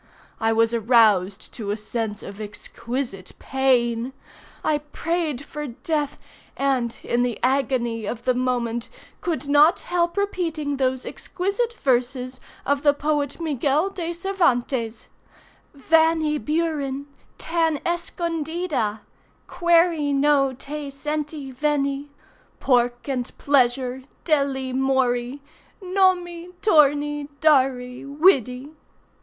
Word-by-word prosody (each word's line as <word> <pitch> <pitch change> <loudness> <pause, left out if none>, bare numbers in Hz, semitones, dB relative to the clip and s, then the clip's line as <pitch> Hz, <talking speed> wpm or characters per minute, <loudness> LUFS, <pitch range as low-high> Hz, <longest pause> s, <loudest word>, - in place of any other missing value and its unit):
I 225 -1 +2
was 225 +1 +2
aroused 215 -4 +3
to 215 -4 -5
a 205 - -1
sense 215 -1 -4
of 200 +2 -8
exquisite 215 -1 -5
pain. 250 -2 +1 0.5
I 300 -1 +1
prayed 300 -1 -3
for 300 -1 -6
death, 290 +4 -2 0.4
and, 260 -4 0
in 240 - 0
the 245 -2 0
agony 245 -4 0
of 235 +2 -5
the 255 - +3
moment, 245 -2 -1 0.3
could 325 -4 -2
not 295 +4 +5
help 345 +1 0
repeating 325 -8 -1
those 260 -1 0
exquisite 400 +6 -2
verses 255 - 0 0.3
of 285 0 +1
the 290 -1 +4
poet 290 -1 -1
Miguel 300 +3 +1
De 345 -3 -4
Cervantes: 265 - 0 0.7
Vanny 320 +1 +3
Buren, 300 -4 -1 0.3
tan 325 -2 0
escondida 330 -9 -2 0.4
Query 335 -4 +2
no 275 -1 +3
te 285 +3 -6
senty 295 0 -4
venny 280 0 0 0.5
Pork 245 -1 +1
and 255 -3 -3
pleasure, 255 -2 +2 0.2
delly 275 -4 +1
morry 260 0 0 0.4
Nommy, 360 -2 +1
torny, 295 -5 +3
darry, 260 -5 +2
widdy! 275 - +2
275 Hz, 105 wpm, -23 LUFS, 245-315 Hz, 0.7 s, not